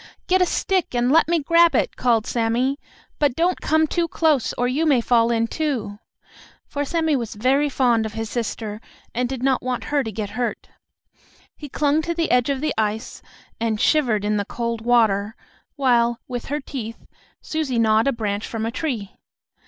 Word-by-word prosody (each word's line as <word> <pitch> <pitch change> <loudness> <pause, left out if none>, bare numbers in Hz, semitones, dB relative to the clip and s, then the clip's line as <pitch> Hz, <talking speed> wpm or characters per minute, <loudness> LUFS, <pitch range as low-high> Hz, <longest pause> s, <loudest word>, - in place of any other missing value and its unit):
"Get 370 0 +2
a 365 - +4
stick 370 -5 0
and 245 +1 +2
let 325 +2 +5
me 340 +1 +2
grab 335 +2 +4
it!" - - +1
called 235 -3 +2
Sammie. 245 +4 0 0.4
"But 285 -4 +2
don't 350 +2 +1
come 315 0 +3
too 335 +2 -1
close, 310 -6 +1
or 245 - 0
you 270 +6 0
may 275 -5 +4
fall 230 -1 +3
in, 230 -1 +1
too," 230 -7 -3 0.7
for 285 - -3
Sammie 320 0 0
was 235 -5 -3
very 270 +7 +2
fond 240 -5 +2
of 215 - -10
his 225 0 -4
sister, 220 -2 -4 0.3
and 245 +1 -1
did 260 -2 -5
not 265 -1 +2
want 255 -1 -3
her 285 -2 +3
to 220 - -5
get 205 -1 -5
hurt. 240 +3 -3 0.9
He 295 - -9
clung 295 +3 +1
to 340 +2 -3
the 330 -1 0
edge 250 +1 +3
of 275 -1 -1
the 310 - 0
ice, 220 +2 -2 0.4
and 225 -2 -1
shivered 235 -10 +2
in 210 0 +1
the 205 - -1
cold 235 0 -4
water, 220 -3 +2 0.4
while, 240 -4 +2
with 245 -2 -5
her 290 +2 -2
teeth, 230 -5 -7 0.4
Susie 310 -6 -2
gnawed 220 +1 +3
a - - +4
branch 210 -4 -3
from 225 -1 -3
a 225 - -2
tree. 235 -8 -3
245 Hz, 190 wpm, -22 LUFS, 225-290 Hz, 0.9 s, let